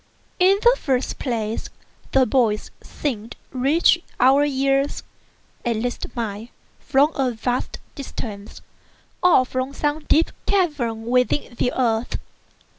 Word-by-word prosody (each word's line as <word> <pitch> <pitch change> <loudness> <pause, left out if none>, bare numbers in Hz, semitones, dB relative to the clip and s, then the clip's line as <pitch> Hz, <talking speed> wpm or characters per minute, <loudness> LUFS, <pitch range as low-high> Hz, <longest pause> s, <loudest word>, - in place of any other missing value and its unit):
In 380 +2 +5
the 485 +1 +6
first 260 -2 -1
place, 225 -4 -2 0.4
the 265 -1 +4
voice 220 -3 +1
seemed 230 -6 -4 0.2
to 260 - -8
reach 320 +6 +4 0.2
our 270 +3 +5
ears—at 275 -3 -2
least 240 +3 -3
mine—from 235 +6 -1
a 270 -3 +1
vast 245 +2 -2 0.2
distance, 215 -7 -7 0.6
or 350 -8 +5
from 255 +2 -3
some 295 +1 0
deep 325 +2 +3 0.2
cavern 285 - 0
within 250 +2 +1
the 245 +1 0
earth. 230 -2 0
255 Hz, 115 wpm, -22 LUFS, 230-285 Hz, 0.6 s, the